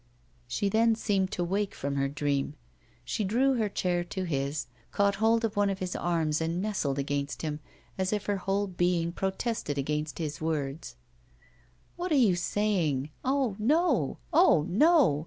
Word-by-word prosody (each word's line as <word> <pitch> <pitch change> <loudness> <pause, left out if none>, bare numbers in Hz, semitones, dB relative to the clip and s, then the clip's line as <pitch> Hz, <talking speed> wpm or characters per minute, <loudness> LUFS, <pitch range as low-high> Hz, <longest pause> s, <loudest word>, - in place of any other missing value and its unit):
She 160 +11 -1
then 225 +3 +3
seemed 200 -4 0
to 175 - -1
wake 195 +3 -1
from 140 0 -3
her 140 0 +1
dream. 140 0 -1 0.5
She 210 - -2
drew 250 +7 +2
her 215 -3 0
chair 180 -3 0
to 190 +2 -4
his, 140 -3 -2 0.3
caught 200 0 +2
hold 225 +1 +3
of 220 -1 -3
one 205 0 +2
of 195 - -2
his 185 -1 -4
arms 165 -3 0
and 165 +2 -1
nestled 185 -9 -1
against 140 +1 -2
him, 150 -1 -3 0.4
as 185 0 0
if 210 -1 -1
her 205 -1 0
whole 195 +2 0
being 175 -2 0
protested 190 - -2
against 150 +2 -2
his 150 -3 -4
words: 150 - -3 1.0
'What 355 0 -3
are - - +4
you 225 -9 +4
saying? 170 -7 0
Oh! 260 -5 +1
no; 310 +11 +2 0.2
oh! 250 - +5
no. 275 - +4
185 Hz, 165 wpm, -29 LUFS, 150-210 Hz, 1.0 s, oh